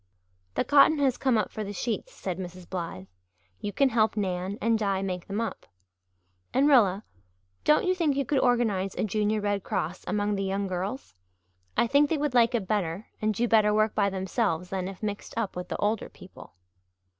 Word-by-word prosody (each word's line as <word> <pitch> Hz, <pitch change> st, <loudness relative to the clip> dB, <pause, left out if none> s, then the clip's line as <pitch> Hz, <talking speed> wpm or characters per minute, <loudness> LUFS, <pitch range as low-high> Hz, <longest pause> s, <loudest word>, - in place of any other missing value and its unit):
"The -, -, +2 dB
cotton 290 Hz, +2 st, +5 dB
has 270 Hz, -3 st, +2 dB
come 260 Hz, -4 st, +1 dB
up 215 Hz, -, -1 dB
for 215 Hz, -, -4 dB
the 205 Hz, 0 st, -5 dB
sheets," 240 Hz, -, -3 dB
said 185 Hz, -, -5 dB
Mrs. 180 Hz, -1 st, -8 dB
Blythe. 165 Hz, -, -5 dB, 0.5 s
"You 205 Hz, -, -4 dB
can 275 Hz, +5 st, +3 dB
help 220 Hz, -2 st, +2 dB
Nan 190 Hz, 0 st, -2 dB
and 230 Hz, 0 st, +2 dB
Di 195 Hz, -2 st, 0 dB
make 180 Hz, -2 st, -4 dB
them 200 Hz, +2 st, -3 dB
up. 230 Hz, -, -4 dB, 0.9 s
And 275 Hz, +3 st, +4 dB
Rilla, 215 Hz, -8 st, +4 dB, 0.6 s
don't 300 Hz, -, +4 dB
you 370 Hz, -, +3 dB
think 330 Hz, -6 st, +1 dB
you 275 Hz, 0 st, 0 dB
could 280 Hz, 0 st, +1 dB
organize 225 Hz, -7 st, +1 dB
a -, -, -1 dB
Junior 215 Hz, +1 st, 0 dB
Red 205 Hz, -1 st, 0 dB
Cross 170 Hz, +4 st, -3 dB
among 205 Hz, 0 st, 0 dB
the 195 Hz, -1 st, -1 dB
young 195 Hz, +1 st, -1 dB
girls? 190 Hz, -, -4 dB, 0.6 s
I -, -, +4 dB
think 285 Hz, +4 st, +3 dB
they 320 Hz, -, +1 dB
would 295 Hz, -2 st, -1 dB
like 240 Hz, 0 st, +4 dB
it 220 Hz, -5 st, -1 dB
better 195 Hz, -1 st, -2 dB
and 215 Hz, 0 st, +2 dB
do 230 Hz, +4 st, 0 dB
better 215 Hz, -2 st, +4 dB
work 215 Hz, 0 st, +2 dB
by 200 Hz, -1 st, +2 dB
themselves 190 Hz, -2 st, -1 dB
than 185 Hz, -1 st, -2 dB
if 195 Hz, +2 st, -9 dB
mixed 205 Hz, -1 st, -4 dB
up 225 Hz, -4 st, -2 dB
with 180 Hz, 0 st, -5 dB
the -, -, -4 dB
older 210 Hz, +1 st, -1 dB
people." 185 Hz, -, -14 dB
210 Hz, 200 wpm, -27 LUFS, 190-235 Hz, 0.9 s, cotton